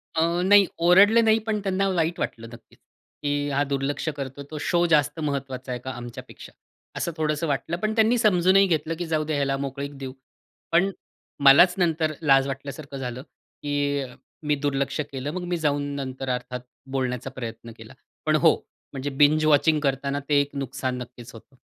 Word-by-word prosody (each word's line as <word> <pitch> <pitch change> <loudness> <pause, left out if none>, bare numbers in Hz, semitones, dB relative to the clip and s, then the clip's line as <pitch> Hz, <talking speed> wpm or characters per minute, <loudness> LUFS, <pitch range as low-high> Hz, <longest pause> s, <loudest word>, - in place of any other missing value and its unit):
अ, 170 +2 +1
नाही, 200 +1 +6 0.2
ओरडले 205 +6 +7
नाही. 220 0 +4
पण 215 -1 0
त्यांना 195 0 0
वाईट 170 -2 0
वाटलं 115 0 -4
नक्कीच, 115 - -16 0.4
की 145 0 -1
हा 140 +1 +1
दुर्लक्ष 140 +3 -2
करतो. 140 +1 -6
तो 155 - -5
शो 175 0 +2
जास्त 150 +1 +2
महत्वाचा 135 -4 -4
आहे 125 - -3
का 130 - -5
आमच्यापेक्षा? 120 -1 -10 0.5
असं 170 - -2
थोडंसं 155 +1 -1
वाटलं 155 +4 -2
पण 215 +3 -1
त्यांनी 225 +2 +4
समजूनही 195 -3 +4
घेतलं, 160 -1 0
की 175 - -2
जाऊदे 155 -2 -1
याला 135 -1 0
मोकळीक 140 +1 -5
देऊ. 135 -1 -7 0.6
पण 185 +4 +3 0.5
मलाच 160 +7 +8
नंतर 165 -3 +1
लाज 135 -3 +4
वाटल्यासारखं 140 +1 -7
झालं, 125 -1 -5
की 145 -2 -3 0.4
मी 150 - +3
दुर्लक्ष 140 0 -2
केलं. 135 +2 -4
मग 185 0 -4
मी 175 0 -2
जाऊन 145 -3 0
नंतर 130 -1 -5
अर्थात 125 0 -3 0.3
बोलण्याचा 130 -1 -2
प्रयत्न 115 -2 -7
केला. - - -12 0.3
पण - - +3
हो, - - +5 0.4
म्हणजे 135 +1 -3
बिंज 150 +3 +3
वॉचिंग 155 +1 +4
करतांना 140 0 -1
ते 145 - +4
एक 140 0 -6
नुकसान 130 -1 -3
नक्कीच 120 -1 -10
होतं. 115 +4 -15
145 Hz, 170 wpm, -24 LUFS, 135-165 Hz, 0.6 s, मलाच